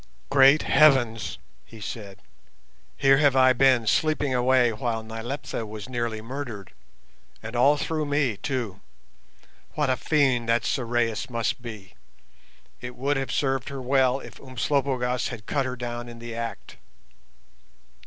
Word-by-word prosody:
"Great 140 Hz, +2 st, +6 dB
Heavens!" 125 Hz, -8 st, +3 dB, 0.3 s
he 115 Hz, -, -14 dB
said: 100 Hz, -2 st, -8 dB, 0.7 s
"here 135 Hz, 0 st, +5 dB
have 145 Hz, -2 st, +3 dB
I 130 Hz, -1 st, +6 dB
been 130 Hz, -2 st, +4 dB
sleeping 150 Hz, +3 st, +1 dB
away 125 Hz, -1 st, +3 dB
while 115 Hz, 0 st, -3 dB
Nyleptha 115 Hz, +4 st, -5 dB
was 105 Hz, -1 st, -8 dB
nearly 120 Hz, -3 st, -3 dB
murdered—and 115 Hz, -2 st, -10 dB
all 140 Hz, +5 st, +4 dB
through 155 Hz, 0 st, -2 dB
me, 145 Hz, -7 st, 0 dB
too. 115 Hz, -7 st, -4 dB, 0.9 s
What 150 Hz, -3 st, +1 dB
a -, -, +2 dB
fiend 130 Hz, -6 st, +1 dB
that 115 Hz, -1 st, +2 dB
Sorais 120 Hz, -2 st, -1 dB
must 115 Hz, +1 st, -2 dB
be! 110 Hz, -6 st, -9 dB, 0.9 s
It 125 Hz, 0 st, -8 dB
would 140 Hz, +3 st, 0 dB
have 135 Hz, -2 st, -3 dB
served 135 Hz, -1 st, -1 dB
her 140 Hz, -1 st, -6 dB
well 130 Hz, 0 st, +2 dB
if -, -, -12 dB
Umslopogaas 130 Hz, 0 st, -1 dB
had 115 Hz, -4 st, -8 dB
cut 135 Hz, -2 st, -1 dB
her 125 Hz, -, -4 dB
down 120 Hz, 0 st, -5 dB
in 120 Hz, -, -10 dB
the 115 Hz, 0 st, -8 dB
act." 115 Hz, 0 st, -6 dB
125 Hz, 135 wpm, -25 LUFS, 115-135 Hz, 0.9 s, Great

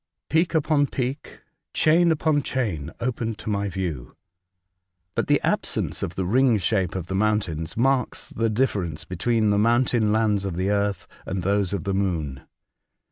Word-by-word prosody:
Peak 165 Hz, +2 st, +2 dB
upon 150 Hz, -2 st, +3 dB
peak, 130 Hz, +2 st, -4 dB, 0.3 s
chain 170 Hz, +2 st, +4 dB
upon 155 Hz, -1 st, +2 dB
chain, 100 Hz, -, -2 dB
opened 115 Hz, -2 st, -2 dB
to 110 Hz, -, -4 dB
my 100 Hz, 0 st, -1 dB
view. 85 Hz, -9 st, -4 dB, 1.0 s
Bat -, -, -1 dB
the -, -, +4 dB
absence -, -, -1 dB
of 85 Hz, -, -3 dB
the 95 Hz, -, -1 dB
ring 120 Hz, +4 st, +3 dB
shape 95 Hz, -1 st, 0 dB
of 95 Hz, -3 st, -3 dB
the 95 Hz, -, -5 dB
mountains 95 Hz, -6 st, 0 dB
marks 130 Hz, +1 st, +1 dB
the 115 Hz, 0 st, -1 dB
difference 100 Hz, -, -1 dB
between 110 Hz, +4 st, +1 dB
the 100 Hz, -, +2 dB
mountain 115 Hz, -1 st, +3 dB
lands 105 Hz, -2 st, +2 dB
of 95 Hz, -3 st, -3 dB
the 95 Hz, +3 st, 0 dB
earth 100 Hz, -2 st, -1 dB, 0.2 s
and 95 Hz, -2 st, -3 dB
those 100 Hz, 0 st, +1 dB
of 100 Hz, -4 st, -2 dB
the 100 Hz, 0 st, -1 dB
moon. 80 Hz, -9 st, -1 dB
105 Hz, 160 wpm, -24 LUFS, 95-125 Hz, 1.0 s, chain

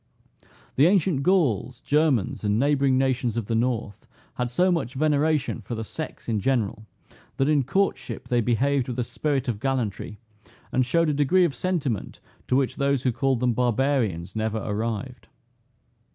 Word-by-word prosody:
The 145 Hz, +5 st, +6 dB
ancient 180 Hz, -6 st, +2 dB
Gauls, 135 Hz, -, +1 dB
Germans, 145 Hz, -10 st, +1 dB
and 105 Hz, 0 st, +1 dB
neighboring 140 Hz, 0 st, +2 dB
nations 130 Hz, -3 st, 0 dB
of 115 Hz, -, -1 dB
the 115 Hz, -, -3 dB
North, 115 Hz, -3 st, -2 dB, 0.3 s
had 125 Hz, -1 st, -2 dB
so 180 Hz, +10 st, +2 dB
much 135 Hz, -8 st, -2 dB
veneration 150 Hz, -2 st, +1 dB
for 115 Hz, +3 st, -6 dB
the 110 Hz, -, -4 dB
sex 155 Hz, +8 st, -7 dB
in 110 Hz, -3 st, 0 dB
general, 110 Hz, -2 st, -1 dB, 0.5 s
that 135 Hz, -, +2 dB
in 150 Hz, -2 st, +3 dB
courtship 195 Hz, +10 st, -1 dB
they 120 Hz, -1 st, +2 dB
behaved 130 Hz, +3 st, +1 dB
with 125 Hz, -, -4 dB
a 125 Hz, -, +1 dB
spirit 140 Hz, +2 st, -2 dB
of 115 Hz, -4 st, -2 dB
gallantry, 120 Hz, -5 st, -2 dB, 0.5 s
and 130 Hz, -, +2 dB
showed 165 Hz, +6 st, +2 dB
a -, -, +1 dB
degree 150 Hz, +6 st, +3 dB
of 160 Hz, -, -1 dB
sentiment, 145 Hz, -, -2 dB, 0.3 s
to 125 Hz, -, +1 dB
which 135 Hz, -1 st, 0 dB
those 140 Hz, -2 st, +1 dB
who 130 Hz, -, +2 dB
called 130 Hz, 0 st, 0 dB
them 125 Hz, -1 st, +2 dB
barbarians, 120 Hz, -7 st, 0 dB
never 110 Hz, 0 st, -1 dB
arrived. 110 Hz, +3 st, -4 dB
130 Hz, 165 wpm, -25 LUFS, 115-145 Hz, 0.5 s, The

